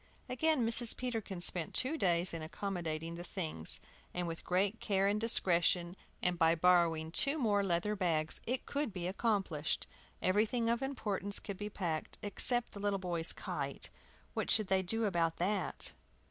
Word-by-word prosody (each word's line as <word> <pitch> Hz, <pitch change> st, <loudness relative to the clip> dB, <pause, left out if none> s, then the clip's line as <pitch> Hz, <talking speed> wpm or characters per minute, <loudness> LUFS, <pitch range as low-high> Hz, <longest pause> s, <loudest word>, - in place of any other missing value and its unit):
Again 270 Hz, 0 st, +2 dB
Mrs. 230 Hz, 0 st, +5 dB
Peterkin 225 Hz, -7 st, -4 dB
spent 175 Hz, -2 st, +3 dB
two 265 Hz, +5 st, +1 dB
days 175 Hz, -, +2 dB
in 165 Hz, -, -4 dB
accommodating 165 Hz, -2 st, -4 dB
the 170 Hz, +1 st, -7 dB
things. 160 Hz, -, +1 dB, 0.4 s
With 170 Hz, -2 st, -3 dB
great 195 Hz, +4 st, 0 dB
care 195 Hz, -2 st, +1 dB
and 205 Hz, +2 st, +1 dB
discretion, 175 Hz, -5 st, +2 dB, 0.3 s
and 180 Hz, -1 st, 0 dB
by 165 Hz, 0 st, +4 dB
borrowing 165 Hz, -2 st, +3 dB
two 280 Hz, -, +2 dB
more 210 Hz, -7 st, +2 dB
leather 190 Hz, +3 st, 0 dB
bags, 165 Hz, -5 st, -1 dB
it 250 Hz, +2 st, -2 dB
could 285 Hz, -4 st, -2 dB
be 180 Hz, -2 st, -4 dB
accomplished. 190 Hz, -6 st, -1 dB, 0.3 s
Everything 225 Hz, +4 st, +1 dB
of 235 Hz, +2 st, -1 dB
importance 205 Hz, -7 st, -3 dB
could 200 Hz, -2 st, -6 dB
be 210 Hz, +1 st, -5 dB
packed, 170 Hz, -6 st, -4 dB
except 240 Hz, +4 st, +1 dB
the 200 Hz, -, -9 dB
little 200 Hz, 0 st, 0 dB
boys' 175 Hz, -3 st, -1 dB
kite. -, -, -4 dB, 0.4 s
What -, -, -2 dB
should 215 Hz, -3 st, +2 dB
they 190 Hz, 0 st, +3 dB
do 225 Hz, +5 st, +1 dB
about 170 Hz, -4 st, 0 dB
that? 195 Hz, +3 st, +3 dB
190 Hz, 160 wpm, -34 LUFS, 170-220 Hz, 0.4 s, Mrs